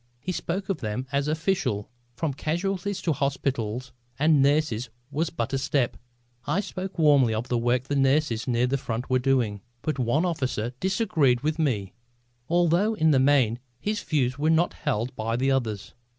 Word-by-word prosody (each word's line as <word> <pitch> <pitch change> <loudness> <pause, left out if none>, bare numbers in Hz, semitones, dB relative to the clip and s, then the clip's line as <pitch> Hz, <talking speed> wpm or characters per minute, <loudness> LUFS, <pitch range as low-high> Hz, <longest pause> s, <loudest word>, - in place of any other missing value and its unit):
He 165 +9 -3
spoke 185 +3 -3
of 195 -5 -1
them 110 +4 -3
as 140 +1 0
official. 160 - 0 0.3
From 150 +2 -1
casualties 185 +7 -2
to 165 - +2
hospitals 130 -3 -2 0.2
and 150 0 +4
nurses 140 -5 +2 0.2
was 155 +3 0
but 165 - -3
a 135 - +1
step. 135 -2 0 0.5
I 150 +7 +1
spoke 190 -1 -5
warmly 140 -8 +4
of 120 +4 -3
the 125 - +1
work 120 +1 +1
the 145 +2 -3
nurses 135 -4 +2
near 120 0 +2
the 135 +2 0
front 120 +1 -4
were 130 - +4
doing. 125 -6 +1 0.2
But 155 -3 -2
one 130 +8 +2
officer 130 -8 -2
disagreed 165 - +2
with 155 +3 -1
me, 105 - 0 0.6
although 175 +5 +3
in 160 -5 +3
the 135 - +4
main 130 -4 +3 0.2
his 210 0 -2
views 130 -3 0
were 155 +2 +2
not 160 +2 +3
held 125 -4 -2
by 115 +1 -2
the 135 +3 +1
others. 110 -6 -2
140 Hz, 175 wpm, -26 LUFS, 125-160 Hz, 0.6 s, and